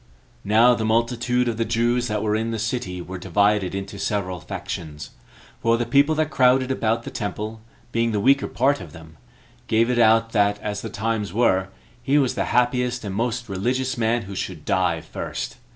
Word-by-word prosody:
Now 115 +4 +5
the 115 - -2
multitude 120 +2 +1
of 115 -2 -1
the 115 - +1
Jews 120 +2 +1
that 105 -1 -2
were 105 -1 +1
in 110 +1 -1
the 115 - -2
city 110 -5 -3
were 95 +1 -7
divided 95 +1 +1
into 100 +1 -6
several 95 -4 -2
factions; 75 -3 -6 0.5
for 115 -2 +3
the 120 - -1
people 140 +6 +3
that 155 0 0
crowded 130 0 +3
about 115 -2 0
the - - -7
temple, 105 +1 -5 0.3
being 115 0 +1
the 105 - 0
weaker 135 +6 +3
part 135 -1 +1
of 80 -5 -10
them, 80 0 -14 0.5
gave 115 +2 +2
it 120 - +1
out 115 0 +4
that, 105 -2 +2
as 105 -1 -4
the 115 - -5
times 110 -3 -2
were, 95 -5 +2 0.3
he 135 +3 +2
was 135 -4 +2
the - - -1
happiest 125 0 +1
and 100 - -4
most 120 +3 -2
religious 125 +7 -1
man 115 0 0
who 100 0 -8
should 90 -4 -5
die 90 -3 +1
first. - - -6
115 Hz, 190 wpm, -23 LUFS, 100-120 Hz, 0.5 s, Now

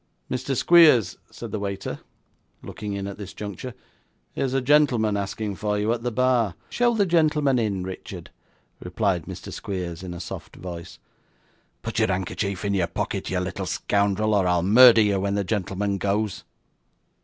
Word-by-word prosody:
'Mr. 130 +1 -2
Squeers,' 150 - +5
said - - -9
the 110 - -3
waiter, 100 -1 -4 0.6
looking 105 -1 -6
in 100 -1 -4
at 100 +1 -7
this 100 -2 -8
juncture; 105 +4 -7 0.6
'here's 135 -1 -1
a - - +3
gentleman 125 -6 +3
asking 100 +1 -3
for 105 +1 -1
you 105 +3 +1
at 120 - -4
the 120 - -1
bar.' 120 -6 +1 0.2
'Show 240 -1 +2
the 205 -2 +3
gentleman 150 -6 +2
in, 100 -5 -1
Richard,' 95 0 -8 0.5
replied 90 -2 -1
Mr. - - -8
Squeers, 90 -4 -5
in 90 -2 -6
a - - -7
soft 85 - -8
voice. 85 -2 -8 0.9
'Put - - -3
your - - +3
handkerchief 95 +1 -2
in 100 - 0
your 90 -3 +1
pocket, 85 - -3
you 95 - 0
little 95 +1 -4
scoundrel, 100 +3 0
or 100 -3 +2
I'll 90 -1 +2
murder 115 +4 +8
you 100 -2 +2
when 100 +1 -1
the 100 - 0
gentleman 100 0 -2
goes. 100 +1 -1
100 Hz, 165 wpm, -24 LUFS, 95-120 Hz, 0.9 s, murder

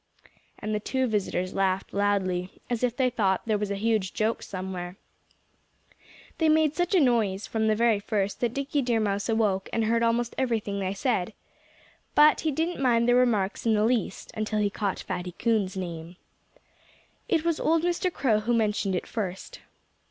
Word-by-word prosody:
And 215 - -4
the 210 - 0
two 260 +5 -1
visitors 190 -5 -1
laughed 190 0 0
loudly, 190 -3 0
as 240 0 -1
if 245 -1 0
they 255 -2 +2
thought 195 -5 +1
there 215 -2 +1
was 210 -1 -2
a 200 - -1
huge 215 -2 0
joke 220 +1 0
somewhere. 185 -1 -6 1.4
They 320 -1 +3
made 310 -1 +3
such 350 +2 0
a - - +6
noise, 220 - +2
from 220 -1 -1
the 215 - +3
very 230 -2 +3
first, 205 -1 -2
that 240 -2 0
Dickie 280 +1 -1
Deer 240 -3 +1
Mouse 200 0 -1
awoke 210 -4 +1
and 225 -1 0
heard 230 +1 +2
almost 235 +1 +1
everything 220 -6 -1
they 190 0 -2
said. 220 -3 -1 0.8
But 300 +1 +6
he 320 - 0
didn't 320 +1 -2
mind 235 -3 +3
their 245 - +5
remarks 230 -4 +1
in 220 - +4
the 210 0 +2
least 240 -1 -1
until 215 0 -2
he 205 -1 +1
caught 200 -2 -2
Fatty 180 0 -5
Coon's 205 -3 0
name. 170 -1 -6 1.1
It 325 -1 +1
was 335 -2 +1
old 325 0 +2
Mr. 355 +1 0
Crow 230 -10 +1
who 235 +3 0
mentioned 210 -3 0
it 180 - -2
first. 190 -4 -5
220 Hz, 180 wpm, -27 LUFS, 195-245 Hz, 1.4 s, a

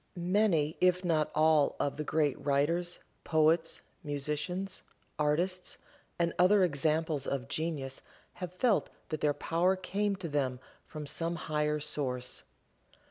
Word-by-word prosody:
Many, 175 -4 +1
if 180 0 +3
not 155 -3 +2
all 155 -2 +4
of 140 -1 0
the 150 - -2
great 150 -2 0
writers, 165 +5 +1 0.3
poets, 160 +1 +2 0.2
musicians, 150 +6 -3 0.4
artists 175 +5 0 0.4
and 170 -1 +1
other 190 +2 +6
examples 155 -2 0
of 135 -1 -2
genius 145 -3 -3 0.4
have 180 -2 -3
felt 205 +4 +2 0.2
that 155 -1 -3
their 145 -1 +2
power 175 +3 +2
came 200 +2 -1
to 185 -2 -5
them 135 -4 -1 0.3
from 155 -1 -7
some 165 +4 -1
higher 150 -1 -1
source. 130 -4 -3
160 Hz, 130 wpm, -31 LUFS, 150-180 Hz, 0.4 s, other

